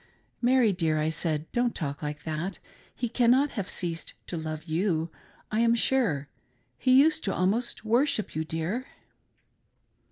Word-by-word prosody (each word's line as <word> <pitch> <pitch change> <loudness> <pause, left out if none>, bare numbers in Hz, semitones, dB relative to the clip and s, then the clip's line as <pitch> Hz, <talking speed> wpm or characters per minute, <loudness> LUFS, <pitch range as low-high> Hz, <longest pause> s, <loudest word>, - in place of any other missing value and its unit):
"Mary 245 -3 +4
dear," 165 -3 +1
I 155 +1 +1
said, 160 -1 0
"Don't 240 0 0
talk 145 -4 -4
like 150 -1 -5
that 165 +4 -3 0.2
— - - -29
he 245 - -2
cannot 255 +5 +3
have 200 -4 -4
ceased 165 -2 -3
to - - -5
love 155 -1 -4
you, 165 -1 0 0.4
I 215 - +1
am 230 0 +4
sure; 225 - +1 0.5
he 255 0 +5
used 315 +2 +4
to 195 - 0
almost 215 +6 0
worship 240 +1 +1
you, 155 - 0
dear." 165 - -3
190 Hz, 155 wpm, -28 LUFS, 160-240 Hz, 0.5 s, he